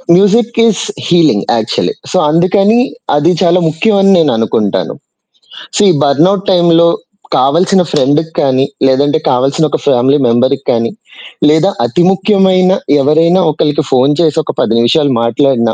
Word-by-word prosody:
Music 220 +5 +1
is 220 - -1 0.2
healing 160 - +1
actually. 110 +3 -2 0.2
So - - -1
అందుకని 195 +7 +1 0.4
అది 150 +4 +1
చాలా 180 0 +2
ముఖ్యం 200 +7 0
అని 195 0 +3
నేననుకుంటాను. 115 - -1 0.8
సో - - +1
ఈ - - +3
బర్నౌట్ 170 +8 +1
టైమ్‌లో 170 -2 +3 0.5
కావాల్సిన 180 +6 +1
ఫ్రెండ్‌కి 155 +5 0
కానీ 135 -1 +1 0.2
లేదంటే 145 +4 +1
కావాల్సిన 135 +5 0
ఒక - - -2
ఫ్యామిలీ 135 +1 +2
మెంబర్‌కి 130 +4 0
కానీ 115 0 -1 0.6
లేదా 160 +5 +2 0.2
అతి 150 +9 0
ముఖ్యమైన 190 -2 +1 0.3
ఎవరైనా 165 +6 +2
ఒకళ్ళకి 150 +1 -1
ఫోను 135 +3 +2
చేసి 160 -2 0
ఒక - - -5
10 115 - 0
నిమిషాలు 140 +5 +1
మాట్లాడినా 115 -1 0
155 Hz, 135 wpm, -11 LUFS, 135-185 Hz, 0.8 s, అని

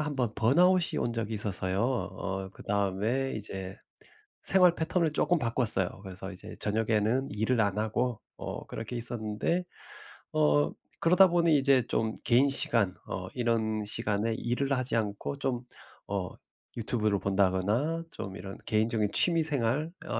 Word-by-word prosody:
1 150 -2 -3
번 120 -4 -1
번아웃이 175 +9 +3
온 120 - -1
적이 115 -1 -3
있어서요. 95 -1 -1
어 95 -6 -2
그다음에 105 +7 -1
이제 95 -3 -5 0.7
생활 180 -2 +5
패턴을 160 -1 0
쪼끔 175 - +2
바꿨어요. 115 -6 +1
그래서 95 +1 -7
이제 90 - -10
저녁에는 110 +4 +1
일을 110 +3 +1
안 100 -1 0
하고 110 +2 -1 0.2
어 - - -6
그렇게 115 +2 -6
있었는데 120 +8 +1 0.7
어 75 -1 +3 0.3
그러다 180 +3 +6
보니 170 -3 +3
이제 135 -2 +4
좀 110 -1 0
개인 130 +4 +4
시간 115 -8 +1
어 95 0 -5
이런 110 -3 0
시간에 110 +1 -1
일을 135 +5 -1
하지 125 -2 -1
않고 105 +5 -3
좀 125 -3 -2 0.4
어 95 -3 -2 0.5
유튜브를 110 -2 +1
본다거나 100 - +1
좀 95 -1 -7
이런 95 +2 -8
개인적인 110 -1 +1
취미 170 -2 +5
생활 145 0 0 0.2
어 - - -2
115 Hz, 295 characters per minute, -29 LUFS, 100-135 Hz, 0.7 s, 그러다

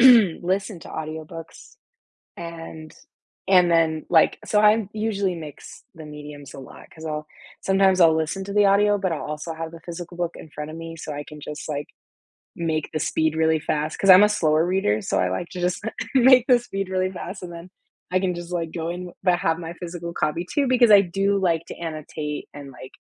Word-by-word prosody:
listen 200 -5 +4
to - - -11
audiobooks, 160 +1 -8 0.6
and 165 -2 -8 0.6
and 180 -2 +6
then, 160 -2 +2
like, 165 -3 +4
so 210 - +2
I 215 -1 +4
usually 205 -4 -1
mix 155 -4 -10
the 160 -1 -10
mediums 150 -1 -10
a - - -9
lot, - - -13
'cause 160 0 -11
I'll 155 0 -4 0.3
sometimes 190 -1 +3
I'll 165 -1 +6
listen 160 +5 -2
to 200 - -6
the 210 0 +5
audio, 205 +1 +4
but 190 -3 -1
I'll 155 - -4
also 150 +2 -5
have 160 0 -6
the 165 -1 -12
physical 175 0 -7
book 175 -1 -2
in 160 - -11
front 150 +1 -7
of 160 - -8
me, 165 0 -7
so 155 -1 -6
I 145 0 -5
can 150 -1 -11
just, 150 +1 -7
like, 145 -1 -3 0.7
make 160 -2 -1
the 155 - -2
speed 160 +1 0
really 160 0 +3
fast, 155 0 -2
'cause 195 - 0
I'm 185 +2 +10
a - - +4
slower 160 -6 +2
reader, 175 - +1
so - - 0
I 90 - +1
like 95 - -3
to 180 - -6
just 180 0 -1 0.3
make 255 -1 +7
the 250 -2 +6
speed 195 -5 -4
really 185 0 0
fast, 185 +1 -7
and 175 -1 -7
then 170 +1 -9 0.4
I 185 - +3
can 185 -2 0
just, 175 0 -7
like, 165 -2 -2
go 165 -1 -3
in, 180 +1 -5
but 180 -2 +3
have 165 -4 +1
my 165 -1 -6
physical 170 -1 -6
copy, 155 +3 -1
too, 285 -3 +2
because 245 -2 +5
I 200 - +9
do 195 +2 0
like 170 -3 +1
to - - -8
annotate 155 -2 -5
and, 140 -1 -9
like, 130 0 -12
170 Hz, 210 wpm, -23 LUFS, 155-190 Hz, 0.7 s, I'm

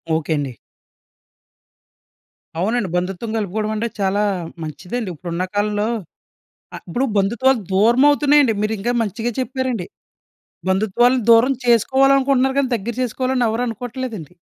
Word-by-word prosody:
Okay. 160 0 -1
అండి. 140 -3 -3 2.1
అవునండి. 210 +2 0
బంధుత్వం 190 +5 -2
కలుపుకోవడం 215 +1 -2
అంటే 225 +2 -1
చాలా 200 +1 +1 0.4
మంచిదండి. 185 +8 -5
ఇప్పుడున్న 170 +2 -3
కాలంలో 205 +1 0 0.9
అ - - -6
ఇప్పుడు 240 +10 -1
బంధుత్వాలు 235 +6 +2
దూరమవుతున్నాయండి. 275 +6 +4
మీరు 215 +1 0
ఇంకా 240 +5 -1
మంచిగా 225 +3 -3
చెప్పారండి. 260 -7 -2 0.8
బంధుత్వాలను 220 +6 +2
దూరం 235 +4 +6
చేసుకోవాలనుకుంటున్నారు 265 +2 +3
గానీ 270 -2 +1
దగ్గర 230 +3 -5
చేసుకోవాలని 255 +1 -1
ఎవరు 225 +2 -1
అనుకోవట్లేదండి. 230 - -6
230 Hz, 110 wpm, -20 LUFS, 195-255 Hz, 2.1 s, దూరం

